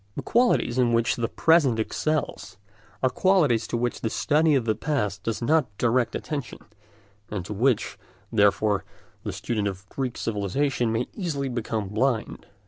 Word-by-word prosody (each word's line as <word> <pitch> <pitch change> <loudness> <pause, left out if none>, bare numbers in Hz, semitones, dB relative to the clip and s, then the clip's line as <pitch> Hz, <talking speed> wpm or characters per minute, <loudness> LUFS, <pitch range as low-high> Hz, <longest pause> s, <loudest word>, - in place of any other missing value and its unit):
The - - -4
qualities 235 - +2
in 120 -2 +3
which 115 0 +2
the 115 -1 -1
present 155 -7 +3
excels 110 -5 -2 0.5
are 130 - +4
qualities 150 - +3
to 120 - -2
which 120 0 -2
the 110 - -1
study 155 +4 +2
of 130 -4 +1
the 110 - +2
past 105 -5 -2
does 115 +3 -3
not 150 +1 +3
direct 120 0 +1
attention, 145 -5 -4 0.7
and 95 -4 -4
to 105 - -5
which, 120 +3 +1 0.3
therefore, 100 -2 +3 0.4
the - - -4
student 105 -4 -2
of 100 0 -6
Greek 130 -3 -3
civilisation 115 +4 -1
may 115 +2 0
easily 150 -9 -2
become 110 -4 -3
blind. 115 +2 -1
120 Hz, 155 wpm, -25 LUFS, 110-140 Hz, 0.7 s, are